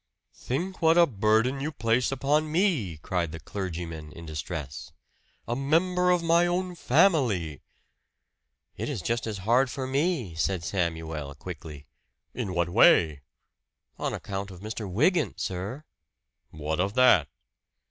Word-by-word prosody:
"Think 180 +9 -4
what 165 +1 +5
a 170 - +8
burden 110 +2 +1
you 150 +3 -2
place 120 -2 +1
upon 145 +3 +1
me!" 155 - +1
cried 85 +1 -2
the 80 - -7
clergyman 85 -6 -6
in 85 - -10
distress. 75 -2 -6 0.6
"A 120 - -1
member 180 +7 +2
of 180 -1 +3
my 170 +1 +4
own 180 +1 -1
family!" 125 - +2 1.1
"It - - -4
is - - -4
just 115 +1 -1
as 105 -2 -3
hard 125 +4 +4
for 130 +1 -4
me," 135 - 0
said 85 +2 -1
Samuel 80 -6 -3
quickly. 75 -3 -9 0.5
"In 95 -2 -4
what 85 0 +1
way?" 80 -4 +5 0.8
"On - - -1
account 100 0 -5
of 90 -1 -11
Mr. 110 -1 -5
Wygant, 155 - +1
sir." 100 +10 -4 0.7
"What 80 +1 -3
of 95 +3 0
that?" 125 - +5
110 Hz, 135 wpm, -27 LUFS, -, 1.1 s, a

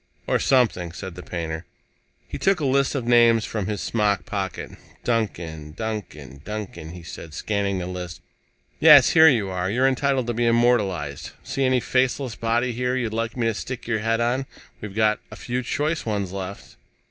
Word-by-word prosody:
"Or - - +1
something," 110 -10 +2
said 95 +1 -7
the 90 - -9
painter. 80 -2 -4 0.6
He - - -6
took 195 -1 +2
a 150 - -1
list 140 +1 +2
of 130 -4 -2
names 120 -2 +5
from 105 -4 -3
his 105 -2 -3
smock 105 -5 0
pocket. 95 -3 -4 0.3
"Duncan, 85 -10 -2
Duncan, 75 - -6
Duncan," 95 -5 -6
he 90 -1 -10
said, 80 -2 -9
scanning 100 +1 -1
the 90 - -3
list. 90 -2 -6 0.6
"Yes 150 -5 +8
here 160 -1 +8
you 110 -8 +1
are. 90 0 -2
You're 125 +6 +2
entitled 135 -1 +1
to 120 - -2
be 120 +1 +1
immortalized. 105 - +1
See 135 - -1
any 130 0 +3
faceless 130 0 0
body 120 +2 0
here 125 +2 -1
you'd 120 -4 -2
like 115 +1 -2
me 120 - 0
to 115 - +2
stick 125 +4 -6
your 115 -2 0
head 115 +1 0
on? 125 +3 0 0.3
We've 105 -2 -7
got 110 -1 +2
a - - -9
few 125 +1 -3
choice 150 +5 -1
ones 100 -4 -2
left." 95 0 -7
110 Hz, 180 wpm, -24 LUFS, 95-125 Hz, 0.6 s, Yes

